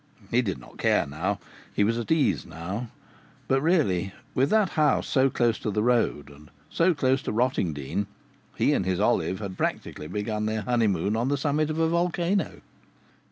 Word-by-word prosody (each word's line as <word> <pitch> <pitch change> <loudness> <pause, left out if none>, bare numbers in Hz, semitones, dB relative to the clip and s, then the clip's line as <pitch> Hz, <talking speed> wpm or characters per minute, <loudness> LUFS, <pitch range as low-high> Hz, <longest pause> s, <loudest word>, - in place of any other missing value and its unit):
He 120 - +4
did 100 - -2
not - - -15
care - - +3
now 90 +8 -2 0.4
he - - +3
was 115 +3 +1
at 115 - -5
ease 160 -3 +2
now 95 +9 -5 0.6
but 135 0 +2
really, 115 - +1 0.2
with 135 +2 +2
that 215 -3 +3
house 150 -4 +2
so 135 0 +3
close 120 -3 +1
to - - -3
the 105 +1 0
road 115 -12 +1
and 75 +1 -16 0.2
so 170 +1 +3
close 135 -1 +2
to - - -3
Rottingdean, 100 - -1 0.5
he - - +2
and - - +1
his 95 0 -1
Olive 95 -3 +1
had 95 -2 -7
practically 75 - -3
begun 105 +4 -2
their 110 0 -1
honeymoon 105 -5 +1
on 115 +3 0
the 140 +1 +1
summit 150 +2 0
of 155 - -2
a 165 0 +3
volcano! 175 +3 0
115 Hz, 180 wpm, -26 LUFS, 95-145 Hz, 0.6 s, He